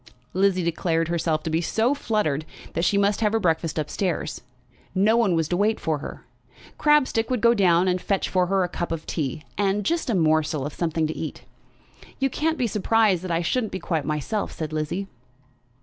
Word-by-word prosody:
Lizzie 190 -1 +2
declared 165 0 0
herself 165 -2 0
to 160 - -3
be 160 +1 +1
so 225 +9 +1
fluttered, 210 - -1 0.3
that 165 - -1
she 200 +3 +3
must 200 +1 +2
have 215 -1 +2
her 225 - +3
breakfast 165 -4 0
up 155 -2 -1
stairs. 170 -5 -2 0.5
No 205 +4 +4
one 220 -7 +3
was 160 -2 +1
to 175 - 0
wait 210 +3 +2
for 155 -2 -1
her. - - -8 0.5
Crabstick 295 -7 +3
would 250 -2 0
go 235 +2 +5
down 185 -4 +3
and 180 0 +1
fetch 195 -2 0
for 180 -1 +1
her 190 0 +2
a - - 0
cup 175 -1 -4
of 165 -1 -3
tea, 150 -1 -3 0.2
and 200 0 +1
just 335 -4 0
a 230 - +2
morsel 155 -3 +2
of 145 - -5
something 165 -2 -1
to 155 - -3
eat. 160 - -6 0.7
"You 270 -1 0
can't 320 +4 0
be 250 - +1
surprised 210 -3 +2
that 185 - -5
I 170 0 0
shouldn't 220 +5 0
be - - -3
quite 160 -5 -1
myself," 155 +8 -2
said 155 -1 -5
Lizzie. 155 +6 -2
180 Hz, 205 wpm, -24 LUFS, 160-215 Hz, 0.7 s, go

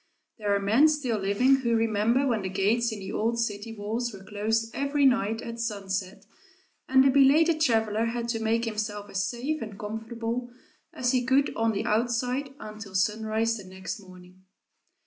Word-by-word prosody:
There 205 -1 +1
are - - +1
men 220 +10 +5
still 280 -8 0
living 205 +8 +3
who 235 -3 0
remember 225 +4 +2
when 235 -5 +1
the 190 - -3
gates 215 +5 +1
in 220 - -5
the 190 -1 -7
old 230 +2 0
city 220 -1 -2
walls 225 +4 -2
were 195 -2 -11
closed 220 +3 -1
every 280 +1 +1
night 225 -3 +2
at 230 0 -7
sunset, 200 -3 -3 0.6
and 265 0 +6
a 270 - +5
belated 305 +4 +4
traveler 225 -5 +2
had 235 0 -2
to 230 -1 -1
make 225 +1 +1
himself 210 -2 -4
as 195 -1 0
safe 275 +6 -3
and 210 -3 -7
comfortable 225 +3 -4 0.4
as 245 -1 0
he 255 -2 +2
could 265 +3 +2
on 225 0 +1
the 205 +2 -2
outside 245 +4 0
until 215 -2 -9
sunrise 220 +3 +1
the 205 - -9
next 190 +3 -7
morning. 185 -1 -15
225 Hz, 175 wpm, -27 LUFS, 205-245 Hz, 0.6 s, and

